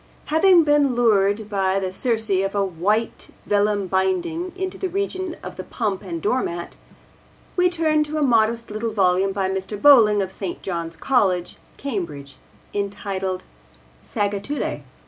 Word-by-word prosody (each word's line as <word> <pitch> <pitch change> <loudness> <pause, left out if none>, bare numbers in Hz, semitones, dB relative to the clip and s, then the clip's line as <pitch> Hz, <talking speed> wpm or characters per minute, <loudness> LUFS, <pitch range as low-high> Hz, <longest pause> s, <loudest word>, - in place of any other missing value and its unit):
Having 345 +1 +6
been 290 -4 +3
lured 210 -3 +2
by 195 -2 0
the 185 -1 -3
Circe 225 0 -1
of 195 +1 +1
a 200 -1 +2
white 200 +6 -1 0.2
vellum 205 -1 +1
binding 190 - -1
into 375 0 -4
the 380 - -3
region 375 -2 -3
of - - -8
the - - -5
pump 210 -5 -3
and 175 -4 -5
doormat, 175 -4 -2 0.8
we 360 0 +4
turn 315 -3 +2
to 305 +1 -4
a 305 - +1
modest 230 -3 +2
little 215 +1 -3
volume 190 -1 +2
by 195 -1 -1
Mr. 190 +2 -4
Bowling 220 -6 +7
of 190 - -6
St. 190 -2 -6
John's 170 -3 -4
College, 190 -9 +1 0.2
Cambridge, 155 - -5 0.4
entitled 195 -2 -3 0.6
Sagittulae. 205 +7 -2
205 Hz, 145 wpm, -22 LUFS, 190-270 Hz, 0.8 s, Bowling